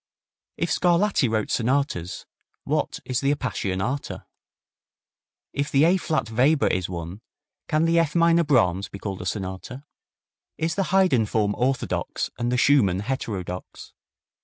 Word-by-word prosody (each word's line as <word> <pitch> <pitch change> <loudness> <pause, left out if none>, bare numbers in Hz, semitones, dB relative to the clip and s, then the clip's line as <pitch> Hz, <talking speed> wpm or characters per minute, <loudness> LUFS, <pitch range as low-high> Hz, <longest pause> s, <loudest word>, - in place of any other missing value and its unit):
If - - -1
Scarlatti 175 - +2
wrote 110 -1 -1
sonatas, 120 - -1 0.4
what - - -1
is 125 -1 -1
the 140 0 +2
Appassionata? 120 0 -3 1.3
If 140 +1 -1
the 140 +1 +3
A 175 +4 +5
flat 155 -10 -2
Weber 135 +6 +3
is 90 -1 0
one, 85 +3 -6 0.5
can 155 0 +2
the 165 0 +3
F 165 -2 0
minor 170 0 +4
Brahms 100 - +2
be - - -8
called 100 -1 -5
a 90 - -4
sonata? 95 +7 -5 0.7
Is 160 +1 -1
the 195 - 0
Haydn 180 - +3
form 105 -1 +1
orthodox 130 +2 -1
and 120 +1 0
the 125 - +1
Schumann 105 -10 +3
heterodox? 100 -7 -5
125 Hz, 135 wpm, -24 LUFS, 100-155 Hz, 1.3 s, A